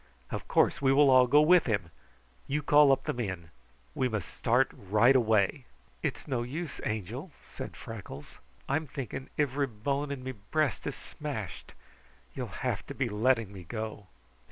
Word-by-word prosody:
Of - - -4
course, - - +3
we 135 -1 +4
will 140 0 +6
all 130 -1 +7
go 145 +4 +6
with 175 +1 +5
him! 105 -7 -1 0.6
You 150 +2 -1
call 145 -1 +6
up 135 0 +2
the 150 - -1
men. 95 -9 -4 0.4
We 130 - 0
must 105 -6 -3
start 125 +3 +2
right 105 +7 +3
away." 110 +2 +2 0.4
"It's - - -3
no 130 -4 -1
use, 145 +6 -5
Angel," 110 - -4 0.2
said - - -7
Freckles. 95 -10 -9 0.3
"I'm 155 +3 0
thinking 130 -1 -6
ivry 140 -1 +1
bone 140 +6 -2
in 135 -2 -5
me 130 - -3
breast 130 +3 -1
is - - -3
smashed. - - -7 0.6
You'll - - -4 0.2
have - - -1
to - - -7
be 130 -3 0
letting 115 -1 +1
me 95 - -8
go!" 110 +1 -6
125 Hz, 165 wpm, -30 LUFS, 105-140 Hz, 0.6 s, all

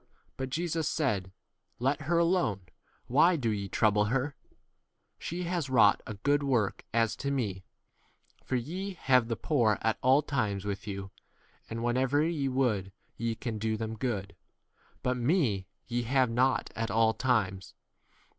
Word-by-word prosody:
But 130 -1 -4
Jesus 165 +1 -1
said, 105 - -1 0.5
Let 135 +4 0
her 165 +4 +1
alone; 170 - +2 0.4
why 160 +8 +4
do 120 -8 0
ye 100 -2 -3
trouble 105 0 +3
her? 135 +5 -1 0.8
she 175 +2 -4
has 170 -5 -2
wrought 110 -6 +5
a 110 - -5
good 145 +8 +1
work 125 -8 0
as 115 -1 +2
7 110 - -7
to 140 - -3
m 140 - +1
me; 100 -8 -2 0.8
for 130 - -2
ye 180 +10 -3
have 130 -7 +3
the 115 - -1
poor 115 -6 +2
at 110 -1 +1
all 135 +4 +4
times 110 -9 -1
with 100 0 -4
you, 100 -1 -5 0.6
and 115 +1 -4
whenever 130 +4 +2
ye 155 -4 0
would 115 -8 0 0.2
ye 115 0 -2
can 110 -2 -4
do 110 0 -1
them 110 0 -4
good; 105 -5 -3 0.7
but 125 0 0
me 120 - +1 0.2
ye 120 0 -1
have 125 0 +2
not 130 +3 +1
at 115 0 -2
all 110 0 +3
times. 100 -8 0
120 Hz, 160 wpm, -30 LUFS, 110-140 Hz, 0.8 s, wrought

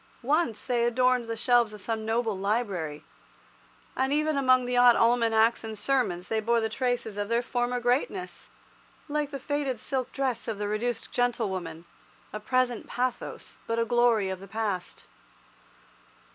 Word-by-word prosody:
Once 280 -4 0
they 245 -2 +1
adorned 250 +1 +2
the 230 0 -3
shelves 240 -2 +3
of - - -10
some 220 +2 -3
noble 225 -1 0
library, 190 -7 -2 0.9
and 265 +1 0
even 305 +1 +1
among 255 -2 +4
the 250 0 -1
odd 245 -1 +7
almanacs 230 -1 +3
and 220 0 -5
the - - -8
sermons 205 -9 0
they 220 - 0
bore 230 +2 +2
the 220 -1 -1
traces 245 -3 -2
of 205 0 -2
their 235 +1 +1
former 245 0 -1
greatness, 260 +10 -2 0.6
like 295 -1 -1
the 280 - -5
faded 275 -3 -2
silk 260 +1 -3
dress 260 -4 -2
of 225 -3 -3
the 205 0 -2
reduced 230 +4 -2
gentlewoman, 190 -9 -2 0.5
a 215 - -4
present 245 +1 0
pathos 250 0 -4
but 230 - -1
a 230 - +2
glory 235 -4 +3
of 190 - -5
the 195 - -11
past. 210 -5 -4
235 Hz, 160 wpm, -27 LUFS, 215-255 Hz, 0.9 s, odd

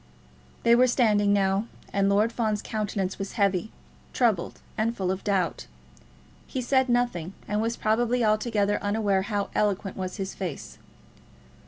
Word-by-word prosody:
They 235 - +5
were 250 +2 +6
standing 210 -5 +3
now, 200 +2 +2 0.3
and 200 0 +2
Lord 210 +3 +3
Fawn's 215 -3 -1
countenance 200 -3 -2
was 195 0 -4
heavy, 200 -1 +1 0.4
troubled, 220 -9 +1 0.2
and 230 +2 -1
full 185 -1 0
of 190 0 -4
doubt. 195 -4 -1 0.8
He 260 - -4
said 260 +1 +2
nothing, 240 -8 0
and 210 +1 0
was 230 +1 -1
probably 235 +2 +1
altogether 215 -1 +1
unaware 205 -2 +1
how 200 0 -2
eloquent 200 -2 0
was 185 -1 -4
his 195 -1 -4
face. 180 -6 -6
210 Hz, 145 wpm, -26 LUFS, 195-230 Hz, 0.8 s, were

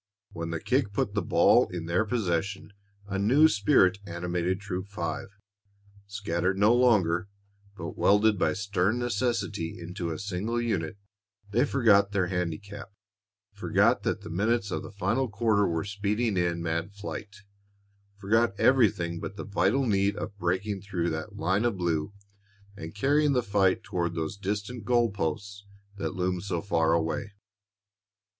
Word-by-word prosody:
When 85 0 -5
the 85 -1 -3
kick 125 - 0
put 100 - -1
the 105 - 0
ball 85 - +4
in 85 -2 -6
their 90 +6 +1
possession, 100 -3 -2 0.3
a 100 -1 -3
new 130 +10 +5
spirit 100 -5 +3
animated 90 +1 -2
Troop 95 -1 -5
Five. 85 -5 -4 0.8
Scattered 95 -2 -1
no 105 +4 +5
longer, 100 -8 +3 0.5
but - - -6
welded 105 0 +3
by 80 -3 +2
stern 100 +2 0
necessity 115 -7 -2
into 85 0 -5
a 80 - -3
single 100 +6 -2
unit, 100 -7 -2 0.5
they 120 +6 +3
forgot 105 -7 +3
their 95 -3 +2
handicap, 95 +3 -4 0.6
forgot - - +2
that - - -2
the - - -9
minutes 100 +3 0
of - - -2
the - - -8
final 110 +6 0
quarter 105 -1 +2
were 85 +2 -1
speeding 105 +2 -1
in 85 -1 0
mad 85 +4 -2
flight, 105 0 -7 0.8
forgot 100 +1 +1
everything 105 -9 +3
but 100 - -6
the - - -5
vital 105 +6 +1
need 100 -2 +1
of 100 - -6
breaking 95 +3 -1
through 90 -4 -2
that 80 0 -5
line 95 +6 +1
of 120 -5 0
blue 85 -1 -1 0.6
and 80 -3 -8
carrying 145 +5 +2
the 125 -2 +1
fight 100 -3 +2
toward 85 -4 -2
those 80 +3 -3
distant 105 +4 -4
goal 120 0 +2
posts 100 +3 -4 0.3
that 100 - -3
loomed 90 -1 -1
so 95 -4 -2
far 80 -3 +1
away. 85 +4 -1
100 Hz, 150 wpm, -28 LUFS, 90-105 Hz, 0.8 s, new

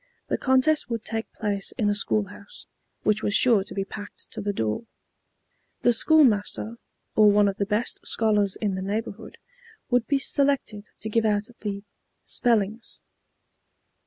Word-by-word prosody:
The - - +1
contest 265 +3 +2
would 230 -2 -4
take 225 0 -3
place 205 -3 -2
in 220 -5 +1
a 205 - +3
school 205 0 0
house, 205 0 -13 0.4
which 215 0 +2
was 205 - 0
sure 225 -6 +4
to 205 - -9
be 195 -1 -1
packed 205 +1 -10
to - - -6
the 205 - -1
door. 110 - -2 1.0
The 240 - +5
school 315 +6 +5
master, 220 -1 0 0.4
or 215 -1 +7
one 205 0 +4
of 195 0 -2
the 200 - -1
best 215 +3 -1
scholars 210 -3 +1
in 205 -3 -2
the 190 - -3
neighborhood, 200 +1 -5 0.5
would 245 -1 +2
be 280 - +2
selected 275 -7 0 0.2
to 220 - -4
give 230 +1 +1
out 210 0 0
the 200 -2 -4 0.4
"spellings." 225 -2 0
215 Hz, 160 wpm, -25 LUFS, 205-230 Hz, 1.0 s, or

